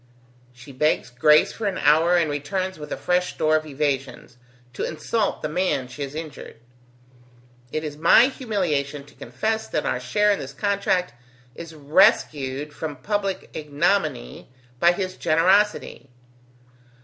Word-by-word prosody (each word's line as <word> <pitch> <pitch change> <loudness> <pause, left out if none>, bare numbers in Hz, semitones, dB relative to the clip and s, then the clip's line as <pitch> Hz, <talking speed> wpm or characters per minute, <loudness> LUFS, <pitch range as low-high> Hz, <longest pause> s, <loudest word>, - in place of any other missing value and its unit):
She 125 +3 -14
begs 145 -1 0
grace 150 +5 +4
for 220 - -3
an 190 -2 -2
hour, 160 +4 +4
and 170 -2 +2
returns 185 +6 -3
with 150 0 -9
a - - -3
fresh 180 0 0
store 155 0 +2
of 155 0 -1
evasions, 135 -3 -3 0.4
to - - -4
insult 200 +7 -2
the - - 0
man 150 -5 -1
she 130 +4 -10
has 140 +1 -5
injured. 155 -7 -8 1.1
It 155 - -3
is 150 -1 -6
my 170 +9 +6
humiliation 170 - -2
to 145 - -19
confess 220 - -3
that - - -2
our - - -1
share 210 0 +1
in 200 - 0
this - - -7
contract 200 - 0 0.4
is 165 +2 -10
rescued 150 - +2
from 150 -1 -5
public 200 +6 -3
ignominy 150 - -1 0.3
by 175 +1 +5
his 185 0 -4
generosity. 185 -1 +1
155 Hz, 145 wpm, -23 LUFS, 145-190 Hz, 1.1 s, my